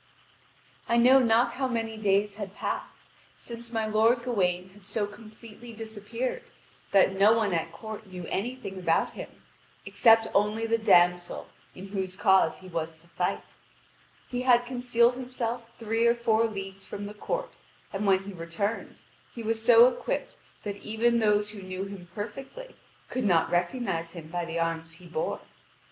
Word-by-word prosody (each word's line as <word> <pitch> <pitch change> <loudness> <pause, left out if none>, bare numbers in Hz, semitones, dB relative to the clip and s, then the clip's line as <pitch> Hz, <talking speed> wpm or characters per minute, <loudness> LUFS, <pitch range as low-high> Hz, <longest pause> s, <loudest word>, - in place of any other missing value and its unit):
I 235 - +3
know 255 +3 +7
not 235 -1 +3
how 265 +1 -1
many 225 -2 -2
days 205 -1 +1
had 200 -1 -7
passed - - -5 0.3
since 235 0 -9
my 225 -2 0
lord 225 +3 +3
Gawain 185 -6 0
had 195 +1 -19
so 210 0 -1
completely 220 +2 -12
disappeared 225 - -4 0.5
that 195 -1 +5
no 200 +3 +6
one 220 -4 +1
at 165 0 -1
court 220 +3 -8
knew 180 -2 -8
anything 210 -2 -4
about 165 -2 +1
him, - - -8 0.6
except 225 -2 +5
only 210 +3 +2
the 230 0 +1
damsel 175 -4 +3 0.3
in 190 +2 -9
whose 190 -2 -3
cause 190 -1 +4
he 185 - -11
was 165 -2 -4
to 165 +2 -19
fight. 170 - -2 0.8
He 245 0 -3
had 245 -1 +4
concealed 245 -1 +2
himself 240 -2 -5
three 225 +1 +1
or 235 - +4
four 230 -1 +2
leagues 195 -3 -6
from 205 - -6
the 205 - -7
court, - - -4 0.4
and 200 +1 -1
when 190 0 +4
he 200 0 -8
returned 175 +6 -3 0.4
he 235 - -6
was 225 0 -1
so 235 0 +8
equipped 255 - -3 0.2
that 205 -1 -4
even 230 +3 +1
those 210 -1 +2
who 210 -2 -9
knew 185 0 -5
him 195 -3 -9
perfectly 270 - -7 0.3
could 255 - -2
not 175 -6 +3
recognise 175 -2 -1
him 165 -3 -9
by 175 0 -2
the 165 0 -4
arms 165 -1 -2
he 175 +2 -15
bore. 165 -2 -3
210 Hz, 165 wpm, -28 LUFS, 190-235 Hz, 0.8 s, so